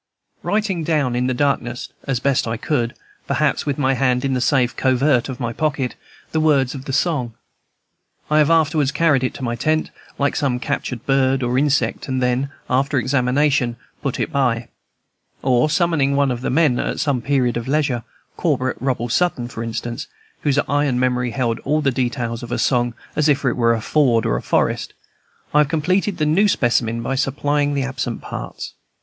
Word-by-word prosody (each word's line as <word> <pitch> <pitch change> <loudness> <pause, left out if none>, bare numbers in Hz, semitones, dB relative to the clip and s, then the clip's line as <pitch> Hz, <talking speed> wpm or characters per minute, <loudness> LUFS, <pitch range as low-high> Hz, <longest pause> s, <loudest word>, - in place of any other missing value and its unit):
Writing 205 -5 -1
down 150 -6 +1
in 125 +1 +1
the - - +1
darkness, 125 -3 -1 0.2
as 135 -4 -1
I - - -24
best 140 -3 +2 0.2
could, 120 -6 0 0.3
perhaps - - 0
with 140 - 0
my 135 -2 +2
hand 125 0 +1
in 135 - 0
the 125 - 0
safe 130 -2 +2
covert 130 0 +2
of 130 0 -6
my 120 -2 -2
pocket, 145 -3 -1 0.4
the 160 - 0
words 140 -5 +3
of 135 -2 -8
the - - -4
song, 135 -5 0 0.9
I 155 0 +3
have 150 - +4
afterwards 155 -4 +3
carried 145 -3 +2
it 130 - -1
to 135 - -7
my 120 -1 -1
tent, 155 +6 0 0.3
like 140 0 0
some 135 -4 0
captured 125 -3 -3
bird 135 -1 +2
or 120 +1 0
insect, 140 +1 +1
and 130 -1 -1
then, 125 +2 0 0.2
after 135 +3 +1
examination, 130 0 +1 0.3
put 135 - -2
it - - -1
by. 125 -4 0 0.7
Or, 130 +2 +3
summoning 155 -5 +2
one 140 -1 +2
of 120 -1 -3
the - - -2
men 140 -3 +3
at - - -2
some 140 -4 0
period 125 -2 +1
of 120 0 -3
leisure, 135 -5 0 0.3
Corporal 130 0 0
Robert 125 -3 -1
Sutton, 130 -5 +1
for 115 - -6
instance, 115 +1 -4 0.3
whose 145 -1 +1
iron 145 -3 +1
memory 125 -1 +1
held 120 -2 -1
all 150 +3 0
the 140 -3 +1
details 120 -2 -2
of 120 - -8
a - - 0
song 120 -2 +1 0.2
as 150 0 +2
if 140 -1 +2
it 130 - +3
were 115 -1 +2
a 115 - -4
ford 120 -4 +2
or - - +1
a - - -2
forest, - - 0 0.6
I 150 - +5
have 150 -2 +3
completed 180 +5 0
the 155 - +1
new 175 +8 +3
specimen 115 - +1
by 135 - -2
supplying 145 +2 0
the 140 - 0
absent 130 -3 -3
parts. - - -6
135 Hz, 190 wpm, -20 LUFS, 125-145 Hz, 0.9 s, I